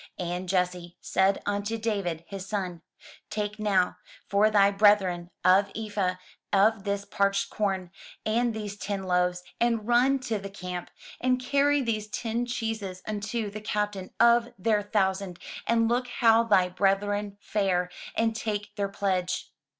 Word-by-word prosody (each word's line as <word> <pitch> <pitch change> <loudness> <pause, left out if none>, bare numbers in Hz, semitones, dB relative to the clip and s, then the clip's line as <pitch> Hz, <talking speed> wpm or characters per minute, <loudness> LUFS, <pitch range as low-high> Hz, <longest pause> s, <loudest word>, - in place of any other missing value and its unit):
And 180 +1 -3
Jesse 180 -1 -1
said 190 +1 +1
unto 205 +2 -1
David, 200 -7 -2
his 195 -1 -7
son, 185 -5 -3 0.5
"Take 210 0 -3
now 195 -4 +2 0.3
for 205 +2 +3
thy 200 -2 +5
brethren 195 -4 +3 0.2
an 195 +2 +5
ephah 205 -4 -1 0.4
of 205 +1 +3
this 200 0 -1
parched 200 -1 0
corn, 190 -4 -1 0.3
and 235 +2 +2
these 210 -2 -5
ten 200 -1 -3
loaves, 180 -1 +1 0.2
and 230 -2 +1
run 250 +3 +4
to 225 -4 -2
the 195 0 -7
camp; 180 -3 -6 0.3
and 255 0 +2
carry 280 +2 +2
these 215 -3 -1
ten 230 +2 -2
cheeses 220 -6 -4
unto 215 +1 -3
the 215 +1 -7
captain 210 -3 -2
of 235 0 +5
their 210 +2 +2
thousand, 195 -3 0 0.3
and 230 0 +3
look 245 +2 +1
how 230 -1 +4
thy 190 -5 +4
brethren 200 +2 0
fare, 185 -4 0 0.2
and 225 0 +1
take 210 -2 -3
their 200 -1 0
pledge. 185 -2 -1
205 Hz, 145 wpm, -27 LUFS, 190-220 Hz, 0.5 s, thy